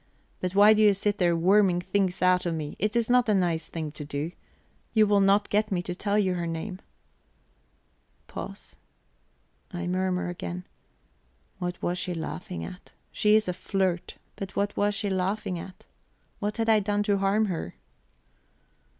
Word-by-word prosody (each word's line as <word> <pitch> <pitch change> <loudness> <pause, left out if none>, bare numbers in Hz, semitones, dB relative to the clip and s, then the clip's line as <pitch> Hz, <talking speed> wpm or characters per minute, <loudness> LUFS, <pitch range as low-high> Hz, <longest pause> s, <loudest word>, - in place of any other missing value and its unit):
But 185 +1 -3
why 205 +2 +8
do 215 - +2
you 205 -2 +6
sit 205 +1 -1
there 175 -2 +3
worming 185 +1 +4
things 185 0 0
out 180 -1 +3
of 165 - -1
me? 150 -2 -5
It 210 +3 +1
is 235 -2 +2
not 245 -1 +3
a 210 - +4
nice 170 -4 0
thing 160 -2 -5
to 150 - -7
do. 145 +3 -4 0.6
You 215 -1 +6
will 205 -1 +3
not 200 +1 +3
get 210 +1 +1
me 175 -2 0
to 180 - -4
tell 200 +3 -1
you 190 -3 +2
her 175 -1 -2
name." 165 +4 -4 1.5
Pause. - - -8 0.9
I 180 -1 -4
murmur 185 0 0
again: 175 +1 -5 0.9
"What 180 -1 -3
was 175 +1 0
she 180 0 -3
laughing 180 +2 -5
at? 185 0 -10 0.2
She 210 0 +3
is 215 -2 +3
a 180 - 0
flirt; 185 -1 -2 0.2
but 195 -1 -6
what 200 0 0
was 205 0 +1
she 205 -1 -1
laughing 185 -1 -1
at? 185 +2 -11 0.5
What 210 0 -2
had 225 0 0
I 220 -1 +5
done 205 0 0
to 205 -1 +1
harm 200 +3 +2
her?" 170 - -4
190 Hz, 175 wpm, -27 LUFS, 175-205 Hz, 1.5 s, why